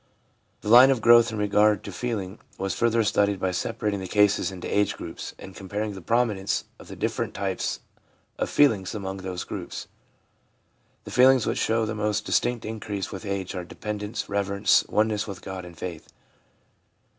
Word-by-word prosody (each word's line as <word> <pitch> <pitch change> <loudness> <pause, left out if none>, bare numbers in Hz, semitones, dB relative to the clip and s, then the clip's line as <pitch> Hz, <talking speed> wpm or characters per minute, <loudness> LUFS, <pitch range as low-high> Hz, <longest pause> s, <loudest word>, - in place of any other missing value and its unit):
The - - -8
line 125 +4 +9
of 135 -3 +2
growth 115 +1 +6
in 110 - -4
regard 105 0 +3
to - - -7
feeling 105 -5 -4 0.2
was 95 0 -2
further 115 -1 +2
studied 100 -1 +1
by 95 - 0
separating 100 +3 -2
the 95 - -5
cases 105 0 +3
into 90 -2 -8
age 105 0 +1
groups - - -7
and 95 - -11
comparing 105 +2 -4
the 95 - -9
prominence 110 -2 0 0.2
of - - -13
the - - -9
different - - -2
types 95 -1 -2 0.6
of - - -1
feelings 110 -10 +3
among 95 -2 -4
those 95 -2 -5
groups. - - -6 1.2
The - - -9
feelings 130 -1 +5
which - - -1
show 115 0 +1
the 110 - -3
most 105 0 -1
distinct 120 -2 0
increase 105 -3 -4
with 100 +1 -7
age 100 -2 -3
are 90 -2 -4
dependence, 105 +4 -5
reverence, 100 0 +2
oneness 110 0 +1
with 95 -3 -8
God, 95 -1 -6
and 85 -2 -12
faith. 85 -3 -7
105 Hz, 170 wpm, -25 LUFS, 95-110 Hz, 1.2 s, line